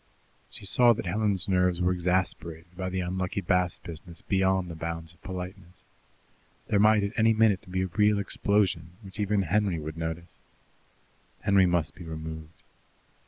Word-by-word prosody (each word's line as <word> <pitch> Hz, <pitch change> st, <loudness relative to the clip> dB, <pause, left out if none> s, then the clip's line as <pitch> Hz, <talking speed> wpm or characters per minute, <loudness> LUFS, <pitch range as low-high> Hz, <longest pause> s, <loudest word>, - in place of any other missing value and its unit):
She -, -, -8 dB
saw 120 Hz, +4 st, +5 dB
that 115 Hz, -1 st, -5 dB
Helen's 100 Hz, +1 st, +1 dB
nerves 90 Hz, -2 st, +2 dB
were 90 Hz, 0 st, +2 dB
exasperated 90 Hz, -2 st, -2 dB
by 95 Hz, 0 st, -3 dB
the 95 Hz, 0 st, -2 dB
unlucky 95 Hz, +2 st, -2 dB
Bast 90 Hz, -1 st, 0 dB
business 85 Hz, 0 st, -9 dB
beyond 95 Hz, -1 st, +1 dB
the 85 Hz, -, -7 dB
bounds 80 Hz, 0 st, -5 dB
of 85 Hz, -, -28 dB
politeness. 90 Hz, -1 st, -8 dB, 0.9 s
There 100 Hz, -, +3 dB
might 105 Hz, 0 st, +5 dB
at 100 Hz, +2 st, -2 dB
any 110 Hz, 0 st, +5 dB
minute 110 Hz, -4 st, +2 dB
be 95 Hz, 0 st, 0 dB
a -, -, -1 dB
real 105 Hz, +3 st, +3 dB
explosion, 95 Hz, -4 st, 0 dB
which 95 Hz, +2 st, -10 dB
even 105 Hz, -1 st, +1 dB
Henry 95 Hz, 0 st, +1 dB
would 80 Hz, +1 st, -6 dB
notice. 80 Hz, +1 st, -4 dB, 1.1 s
Henry 100 Hz, -2 st, +4 dB
must 85 Hz, -3 st, +1 dB
be 90 Hz, -, -11 dB
removed. 80 Hz, 0 st, -8 dB
90 Hz, 160 wpm, -28 LUFS, 85-100 Hz, 1.1 s, saw